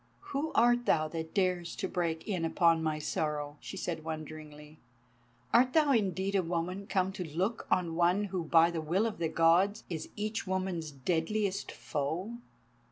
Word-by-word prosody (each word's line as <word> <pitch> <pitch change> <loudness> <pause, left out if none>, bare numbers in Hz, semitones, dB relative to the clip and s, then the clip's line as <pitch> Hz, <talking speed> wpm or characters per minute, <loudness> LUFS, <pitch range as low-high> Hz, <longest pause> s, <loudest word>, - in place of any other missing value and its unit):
"Who 290 +3 -1
art 240 +1 +4
thou 155 0 +3
that 160 0 -6
dares 180 -3 0
to 190 - -2
break 170 -3 -2
in 185 -6 -1
upon 165 0 +3
my 155 -1 0
sorrow?" 150 -1 -2
she 195 - -8
said 165 -4 -3
wonderingly. 155 -1 -8 0.7
"Art 250 +2 +5
thou 305 -3 +4
indeed 195 -4 +1
a 195 - +3
woman 180 +3 -3
come 190 -2 +1
to 190 -1 -5
look 205 +6 -1
on 175 -3 +1
one 175 +4 +3
who 190 -4 -3
by 165 +1 +5
the 165 -2 -3
will 175 +8 +1
of 225 -5 -3
the 165 -2 0
Gods 175 +6 +3
is 160 -2 -4
each 215 0 -3
woman's 185 -4 -2
deadliest 180 +8 -1
foe?" 165 +10 -3
175 Hz, 165 wpm, -31 LUFS, 160-200 Hz, 0.7 s, Art